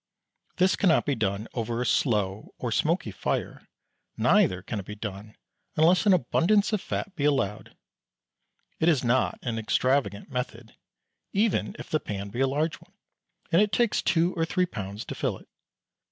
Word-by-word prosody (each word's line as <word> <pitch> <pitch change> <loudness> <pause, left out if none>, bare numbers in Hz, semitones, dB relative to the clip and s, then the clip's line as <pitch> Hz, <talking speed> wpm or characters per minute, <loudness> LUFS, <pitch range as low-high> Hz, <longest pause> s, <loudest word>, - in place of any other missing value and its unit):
This 185 +1 +4
cannot 175 -5 +3
be 145 - +1
done 105 -2 -2
over 115 0 -2
a 125 - -1
slow 105 -7 0
or - - -3
smoky - - +1
fire, - - -3 0.5
neither 90 0 +3
can 105 +1 -4
it 95 - -7
be 105 - -6
done 105 0 -7 0.4
unless 175 +6 +4
an 200 - +7
abundance 190 - +2
of 210 - +1
fat 195 - -4
be 145 - -3
allowed. 135 -9 0 1.0
It 160 - +4
is 145 -7 +2
not 125 +2 +2
an 115 -3 -2
extravagant 115 0 0
method, 125 -3 -5 0.6
even 210 0 +1
if - - -10
the 155 - +2
pan 100 -6 -5
be 120 +5 -6
a 135 - +3
large 150 +4 -1
one, - - -21 0.6
and 170 - +5
it 210 -1 +2
takes 235 -3 +2
two 170 +1 +2
or 165 - -1
three 180 +3 +1
pounds 100 - -6
to - - -5
fill - - -2
it. - - -19
130 Hz, 170 wpm, -27 LUFS, 105-170 Hz, 1.0 s, an